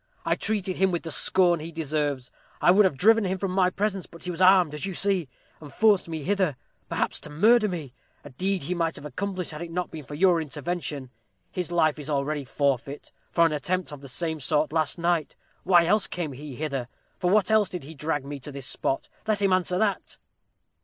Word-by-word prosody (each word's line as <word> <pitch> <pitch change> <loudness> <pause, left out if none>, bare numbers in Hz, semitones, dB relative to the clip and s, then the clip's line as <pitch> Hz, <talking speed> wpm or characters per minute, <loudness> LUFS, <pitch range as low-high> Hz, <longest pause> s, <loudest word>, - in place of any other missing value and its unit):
I - - +2
treated 195 -4 -2
him 190 +1 +3
with 175 -2 -2
the 165 - -5
scorn 175 +1 +3
he 160 +2 -7
deserved. 150 -5 -2 0.3
I - - +5
would 200 +2 +6
have 150 -8 +1
driven 225 - +5
him 190 0 -1
from 190 0 -2
my 185 -1 +3
presence, 195 -1 -2
but 170 - -14
he 180 - -3
was 175 +1 -5
armed, 185 -4 +6
as 150 - -4
you 190 - -5
see, 190 -7 0 0.3
and 150 -2 -11
forced 210 -3 +3
me 160 -2 -4
hither, 185 -6 0 0.3
perhaps - - -1
to - - -10
murder 215 +8 +4
me; 155 -8 -5 0.3
a 145 - -11
deed 185 +6 -1
he 175 - -2
might 165 -2 -1
have - - -9
accomplished 185 +3 -3
had 150 +1 -7
it 170 - -5
not 180 +2 -3
been 155 -2 -7
for 145 +2 -8
your 175 0 +4
intervention. 150 -3 -4 0.4
His 180 -2 -3
life 155 -3 +2
is 150 0 -6
already 145 0 -1
forfeit, 140 +1 -2 0.2
for 170 - +4
an 165 - +2
attempt 180 +4 -2
of 145 -2 -9
the 140 - -10
same 160 +3 -1
sort 150 +2 +1
last 155 -1 +1
night. 170 -2 0 0.3
Why 175 -2 +6
else 210 +3 +2
came 170 -5 -4
he 140 0 -8
hither? 140 -4 -3 0.3
for 180 - +1
what 200 0 +3
else 215 -3 +4
did 180 -5 -6
he 150 +4 -10
drag 150 -1 -2
me 140 0 -6
to 140 +3 -7
this 140 -1 -5
spot? 135 - -1 0.2
Let 215 -2 +2
him 195 -2 +3
answer 180 -1 +1
that!" 210 -1 -1
170 Hz, 220 wpm, -26 LUFS, 150-185 Hz, 0.4 s, would